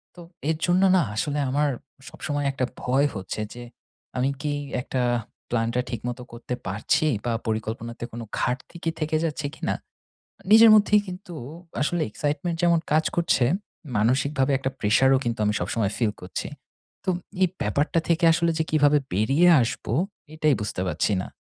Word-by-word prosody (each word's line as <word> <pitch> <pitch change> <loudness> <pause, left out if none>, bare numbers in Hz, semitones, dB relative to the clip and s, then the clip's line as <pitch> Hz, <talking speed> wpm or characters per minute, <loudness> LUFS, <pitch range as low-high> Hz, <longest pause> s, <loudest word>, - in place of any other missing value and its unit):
তো - - -13 0.3
এর 160 - +1
জন্য 180 +2 +3
না 185 - +5
আসলে 145 +6 -1
আমার 145 +2 +2 0.4
সবসময় 145 -3 -3
একটা 135 -1 -1 0.2
ভয় 135 +3 +2
হচ্ছে 95 +2 -4
যে 120 0 -9 0.5
আমি 130 +2 +2
কি 150 -1 -1 0.3
একটা 130 0 -2 0.5
প্লানটা 120 +1 0
ঠিকমতো 120 +2 -4
করতে 120 +1 -6
পারছি 110 +10 +1 0.2
বা, 120 - +1 0.2
পরিকল্পনাতে 110 +2 -3
কোন 120 - -6 0.2
ঘাটতি 125 +7 -2 0.2
থেকে 155 0 -1
যাচ্ছে 150 -2 -3
কিনা? - - -2 0.6
আ - - -20
নিজের 225 +1 +9
মধ্যেই 210 0 +5
কিন্তু 180 -1 -8 0.5
আসলে 170 +3 +1
এক্সাইটমেন্ট 165 - -2
যেমন 170 -1 +4
কাজ 155 +1 +4
করছে, 170 -6 +2 0.5
মানসিকভাবে 135 +5 +2
একটা 135 0 -2
প্রেশারও 130 +6 +4
কিন্তু 115 -1 -1
আমি 105 - +2
সবসময় 110 -3 -1
ফিল 110 -4 +1
করছি। 90 +1 -5 0.6
তো 195 - -1
উম - - -2 0.3
এই 185 - +5
ব্যাপারটা 145 +10 +1
থেকে 170 +1 +2
আসলে 170 0 +2
যে 160 - +2
কীভাবে 150 -1 +5 0.2
বেরিয়ে 135 - +3
আসবো, 115 -1 -2 0.4
এটাই 155 -3 +2
বুঝতে 105 -3 -3
পারছি 100 +3 0
না। - - -6
135 Hz, 155 wpm, -25 LUFS, 115-160 Hz, 0.6 s, নিজের